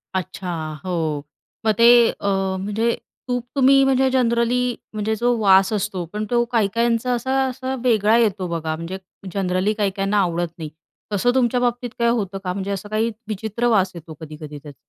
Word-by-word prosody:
अच्छा! 185 0 -4 0.4
हो, 160 -5 -2 0.4
मग 220 - +4
ते 230 - +5 0.3
अ, - - -6 0.4
म्हणजे 220 +4 0 0.4
तूप 245 -1 -1
तुम्ही 275 0 +5
म्हणजे 265 0 +3
जनरली 240 -1 +2 0.3
म्हणजे 215 +1 -1
जो 240 +2 +1
वास 195 -1 +5
असतो, 200 -3 -2
पण 210 +1 -2
तो 240 0 +3
काही-काहींचा, 230 +2 +1
असा 260 +3 0
असा 260 +1 -4
वेगळा 220 -2 +4
येतो 205 -5 +1
बघा, 160 -2 -2
म्हणजे 165 +4 -6 0.4
जनरली 190 +1 0
काही-काहींना 200 -1 0
आवडत 175 -2 -1
नाही. 160 -3 -6 0.4
तसं 225 +5 +2
तुमच्या 250 -1 +2
बाबतीत 245 0 -1
काय 235 - +3
होतं 205 -5 -1
का? 180 -1 -2
म्हणजे 195 +1 -4
असं 200 +1 -5
काही 220 +2 0 0.2
विचित्र 220 +3 -2
वास 195 -5 +3
येतो 165 -1 -9
कधी-कधी 150 -1 -8
त्याचा. 145 -2 -11
210 Hz, 165 wpm, -21 LUFS, 185-240 Hz, 0.4 s, ते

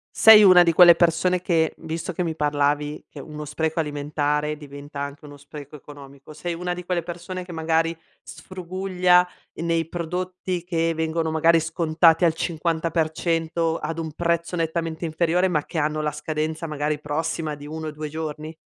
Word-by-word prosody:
Sei 220 -1 +9
una 185 -2 +8
di 170 -1 +2
quelle 175 0 +8
persone 180 +2 +2
che, 165 -3 +1
visto 165 +2 -5
che 180 - -4
mi 165 -2 -2
parlavi 145 0 -1
che 145 - -10
uno 150 +1 -8
spreco 160 +2 -2
alimentare 150 0 -1
diventa 145 0 -10
anche 140 +1 -6
uno 145 -1 -11
spreco 145 0 -11
economico, 140 0 -13
sei 170 +3 -4
una 180 +1 -3
di 180 0 -7
quelle 180 -1 -1
persone 175 +2 -7
che 180 - -9
magari 165 +1 0 0.2
sfruguglia, 180 +2 0 0.3
ehm, 165 - -6
nei 165 -1 0
prodotti 180 +1 -4
che 165 -2 0
vengono 160 0 -1
magari 165 +1 +4
scontati 165 +1 +3
al 165 - +3
50% 165 0 -1
ad 165 +1 -5
un 160 -1 -4
prezzo 170 +2 -1
nettamente 165 0 -2
inferiore, 170 +3 +1
ma 155 -5 0
che 165 - -7
hanno 155 0 0
la 150 0 -1
scadenza 155 +2 -3
magari 150 0 -2
prossima 155 +1 -3
di 145 0 -11
1-2 155 -1 -6
giorni? 155 0 -6
160 Hz, 165 wpm, -23 LUFS, 150-170 Hz, 0.3 s, Sei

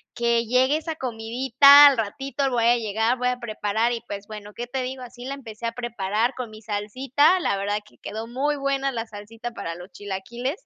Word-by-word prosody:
que 235 -1 +1
llegue 260 +5 +3
esa 320 0 -5
comidita, 260 +4 +6
al 275 - +4
ratito 270 +5 -2
voy 235 -2 +1
a 240 +1 +5
llegar, 225 +3 0
voy 250 0 +1
a 250 - -1
preparar", 220 +1 -1
y, 230 - -4
pues, 200 0 -7
bueno, 210 -1 -9
¿qué 240 0 -6
te 260 +1 -3
digo? 255 0 -5
Así 245 0 -10
la 275 +1 -4
empecé 230 -4 -9
a - - -2
preparar, 230 0 -1
con 250 -3 -5
mi 215 - -12
salsita, 255 - +1
la 200 - 0
verdad 205 +1 -1
que - - -22
quedó 220 +2 -6
muy 275 +5 -1
buena 275 0 0
la 230 -2 -4
salsita 225 +3 -8
para 165 -7 -6
los 180 +2 -11
chilaquiles. 235 - -5
235 Hz, 210 wpm, -24 LUFS, 215-265 Hz, -, comidita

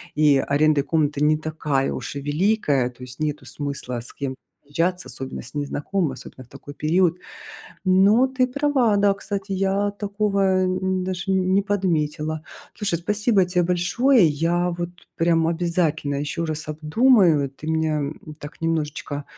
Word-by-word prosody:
и 150 -2 +4
арендой 145 +1 +2
комнаты 150 -1 0
не 155 +1 +4
такая 150 -3 -1
уж - - -6
и - - -4
великая, 145 - +1
то 125 0 -18
есть 125 0 -10
нету 150 -2 -2
смысла 140 -3 -4
с 120 - -11
кем 135 -2 -4 0.3
съезжаться, 165 +1 -1
особенно 130 +1 -6
с 120 - -12
незнакомыми, 145 +3 -2
особенно 130 0 -11
в - - -28
такой 140 +2 -11
период. 170 +4 +2 0.7
Но 200 +7 +5
ты 260 -1 +1
права, 260 -4 +1
да, 200 0 +3
кстати, 200 0 -5
я 195 +1 +1
такого, 205 0 -1 0.3
э, 185 0 0 0.3
даже 185 +1 -3
не 190 +1 +2
подметила. 155 -6 -1 0.3
Слушай, 205 -5 -1
спасибо 210 +2 +2
тебе 180 -1 +1
большое, 180 +6 +3
я 170 +4 +1
вот 175 0 -4 0.3
прям 165 -1 +2
обязательно 165 -4 0
ещё 150 +4 -3
раз 155 -1 -4
обдумаю, 160 - +3
ты 140 +3 -12
меня, 160 -1 0
м, 150 +1 -6
так 145 0 -10
немножечко 150 -3 -2
165 Hz, 150 wpm, -23 LUFS, 145-195 Hz, 0.7 s, Но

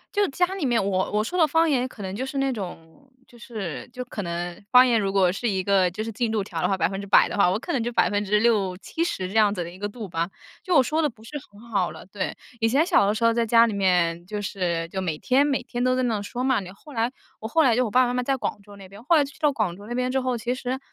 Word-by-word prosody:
就 410 -1 +2
家 360 +6 +1
里 380 -7 -3
面 240 -4 +2
我 190 -1 0
我 210 0 +2
说 360 +12 -3
的 325 - +6
方 325 +2 +2
言 255 -4 +1
可 245 -5 -11
能 190 0 -5
就 255 - -3
是 270 +1 -4
那 270 0 +1
种， 195 +4 -9 0.2
就 240 - -18
是 215 - -6
就 250 0 -6
可 225 -4 -6
能 175 +1 -5
方 250 0 +8
言 235 -3 +3
如 195 -1 -1
果 190 -2 +4
是 235 +5 -2
一 190 -3 0
个 190 -2 +3
就 195 +5 -5
是 225 - -4
进 230 +1 -1
度 215 -2 0
条 175 -4 -5
的 180 - +2
话， 195 - +1
100% 195 +1 +3
的 - - -5
话， 200 -3 +4
我 190 - 0
可 345 +9 -5
能 260 - 0
就 240 +1 -3
60%-70% 205 - 0
这 195 - -9
样 210 -2 +4
子 180 - -3
的 170 - -7
一 180 - -13
个 205 - -3
度 215 -1 -8
吧， 170 +1 -2 0.3
就 365 - -1
我 270 - +7
说 310 +5 0
的 300 - +2
不 220 -2 -20
是 230 - -11 0.2
很 205 +1 -17
好 195 -5 +1
了， - - -11
对。 195 0 -4 0.2
以 225 - +3
前 275 +7 +3
小 345 - +4
的 205 - +1
时 225 +2 -2
候 230 - +5
在 235 0 +1
家 230 +1 +6
里 225 - -2
面 175 -4 +1
就 210 +2 -4
是 175 -4 -2
就 190 +2 -4
每 165 -5 -2
天 265 - +3
每 275 -2 0
天 245 -1 -4
都 255 0 +2
在 255 - +1
那 225 -4 0
说 240 +5 -5
嘛， 260 -1 +3 0.2
后 295 +8 -15
来 235 0 0 0.3
我 220 - -5
后 325 +6 +3
来 255 -6 +4
就 255 - +3
我 225 - -3
爸 255 +4 +5
爸 - - +2
妈 245 - -2
妈 250 - 0
在 270 +2 0
广 215 - -4
州 205 0 -14
那 195 -1 -12
边， 200 +3 -13
后 335 - +4
来 295 - +4
去 285 +3 -11
到 295 -2 +3
广 205 -9 -1
州 205 - -12
那 240 - -5
边 250 +1 0
之 265 0 +1
后， 255 -1 -1
其 240 +3 -2
实 255 0 -3
220 Hz, 315 characters per minute, -24 LUFS, 195-255 Hz, 0.3 s, 方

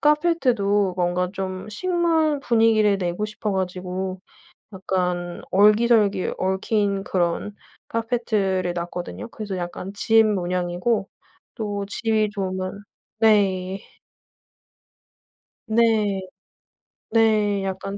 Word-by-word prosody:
카페트 300 -3 +3
도 200 -2 +1
뭔가 180 0 0
좀 190 0 -5
식물 325 - +1
분위기를 225 -4 +3
내고 180 +3 -2
싶어 210 -1 -4
가지고 185 0 -3 0.5
약간 180 -2 -2
얼기설기 210 0 +4
얽힌 195 +1 0
그런 180 +3 -1 0.3
카페트 230 0 -2
를 190 -3 0
놨거든요. 170 - -5
그래서 205 -3 -6
약간 180 +2 -5
짚 225 +2 +4
모양이고 180 +1 -1 0.5
또 205 -3 -3
집이 215 0 0
좋으면 190 0 -4 0.4
네. 195 -3 +2 1.9
네. 220 -3 +2 0.9
네 215 -3 +2
약간 195 +1 -4
200 Hz, 195 characters per minute, -23 LUFS, 185-220 Hz, 1.9 s, 얼기설기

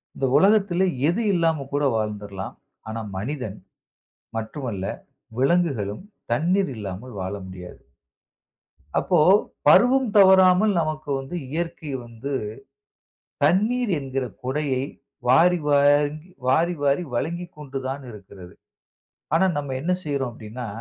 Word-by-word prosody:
இந்த 135 - -1
உலகத்திலே 195 -1 +4 0.2
எது 210 +7 0
இல்லாம 165 -5 +1
கூட 145 - +1
வாழ்ந்துருல்லாம். 105 -3 -4 0.3
ஆனா 110 +1 -4 0.2
மனிதன் 110 -2 -4 0.8
மட்டும் 120 +5 -5
அல்ல, 95 -2 -4 0.5
விலங்குகளும் 135 - +1 0.3
தண்ணீர் 175 +6 +1
இல்லாமல் 105 +4 -7
வாழ 95 +2 -3
முடியாது. 90 -1 -10 1.2
அப்போ, - - +2 0.5
பருவம் 255 0 +6
தவறாமல் 190 +1 +6
நமக்கு 155 -2 -3
வந்து 135 +6 -7 0.2
இயற்கை 165 -2 -4
வந்து, 120 +5 -6 1.1
தண்ணீர் 220 +3 +2
என்கிற 135 -1 -3 0.2
கொடையை 130 0 -1 0.5
வாரி, 175 +7 +5
வாரி, 145 +1 +4 0.3
வாரி, 165 +7 +3
வாரி 140 +5 +2
வழங்கிக்கொண்டு 150 -1 -4
தான் 135 +1 -4
இருக்கிறது. 95 -4 -12 0.8
ஆனா, 190 - +4
நம்ம 140 -2 -3
என்ன 180 +4 -1
செய்றோம் 140 -4 -2
அப்பிடின்னா, 115 +2 -7
145 Hz, 105 wpm, -24 LUFS, 120-175 Hz, 1.2 s, பருவம்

